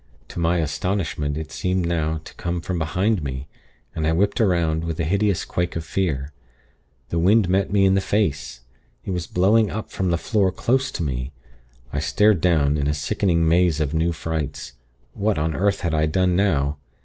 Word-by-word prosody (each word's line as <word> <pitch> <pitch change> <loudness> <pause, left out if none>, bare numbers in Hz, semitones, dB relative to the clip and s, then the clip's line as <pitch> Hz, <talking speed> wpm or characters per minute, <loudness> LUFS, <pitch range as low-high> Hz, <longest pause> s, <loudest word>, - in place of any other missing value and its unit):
To - - -6
my 85 +1 +2
astonishment, 80 -2 -2
it 80 -1 -6
seemed 90 -1 -1
now 80 -2 -1
to - - -12
come 85 0 -3
from 90 +1 -3
behind 90 +6 0
me, 65 0 -5 0.5
and 80 -1 -1
I 80 - +2
whipped 100 +5 +1
'round, 85 -6 +2
with 85 0 -4
a - - +1
hideous 100 +2 +1
quake 90 0 -2
of 80 -1 -4
fear. 75 -7 -2 0.8
The 85 - -1
wind 100 +4 +4
met 95 +2 +1
me 100 -1 +4
in 95 - +4
the 95 - +2
face. 70 - -1 0.4
It - - -3
was 90 -2 -3
blowing 105 +4 +3
up 110 +1 -5
from 95 -1 -1
the 85 - +2
floor 100 +1 +1
close 130 +7 0
to 85 - -2
me. 65 -1 -3 0.6
I - - 0
stared 105 -4 +3
down, 75 -4 +3
in 70 - 0
a 75 - 0
sickening 85 +3 +1
maze 85 -1 +3
of 75 -1 -1
new 80 +2 +1
frights. 80 -3 -4 0.4
What 105 +1 0
on 80 +1 0
earth 100 +1 0
had 85 -2 -1
I 80 0 +2
done 90 +2 +1
now! 75 -7 +1
85 Hz, 195 wpm, -22 LUFS, 80-95 Hz, 0.8 s, wind